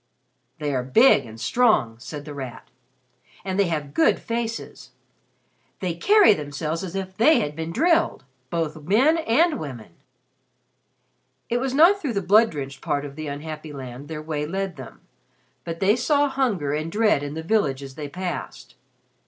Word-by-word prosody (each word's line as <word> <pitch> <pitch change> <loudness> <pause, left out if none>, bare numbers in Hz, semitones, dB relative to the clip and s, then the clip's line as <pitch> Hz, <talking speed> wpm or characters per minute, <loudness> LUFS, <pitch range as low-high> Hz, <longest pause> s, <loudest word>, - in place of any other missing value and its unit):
'" - - -48
"They 150 -2 -2
are 130 - 0
big 135 - +4
and 110 0 -11
strong," 130 - +2
said 145 +3 -8
The 150 - -7
Rat. 130 -5 -8 0.8
"And 190 0 -2
they 200 - +4
have 150 -4 -3
good 160 - +3
faces. 230 0 -5 0.9
They 180 -3 -2
carry 405 - +5
themselves 155 +2 -4
as 185 0 -6
if 190 -1 -4
they 300 +10 +5
had 150 0 -3
been 160 +1 -4
drilled 330 - +2 0.3
both 160 -1 -3
men 250 - +3
and 315 +4 +2
women." 125 - -8 1.6
It 240 - +1
was 265 +1 -2
not 355 +7 +6
through 275 -6 -2
the 200 - -1
blood 215 +5 +5
drenched 140 -3 -7
part 145 0 -1
of 140 -1 -9
the 155 0 -6
unhappy 155 +2 -6
land 135 0 -8
their 155 0 -6
way 150 -1 -3
led 190 +1 -3
them, - - -11 0.6
but 165 -1 -5
they 200 +3 +4
saw 285 +4 +2
hunger 225 - -1
and 155 +2 -3
dread 210 -6 +2
in 145 +1 -5
the 160 - -5
villages 140 -9 0
they 145 +1 -7
passed. 150 -8 -6
165 Hz, 170 wpm, -24 LUFS, 145-225 Hz, 1.6 s, not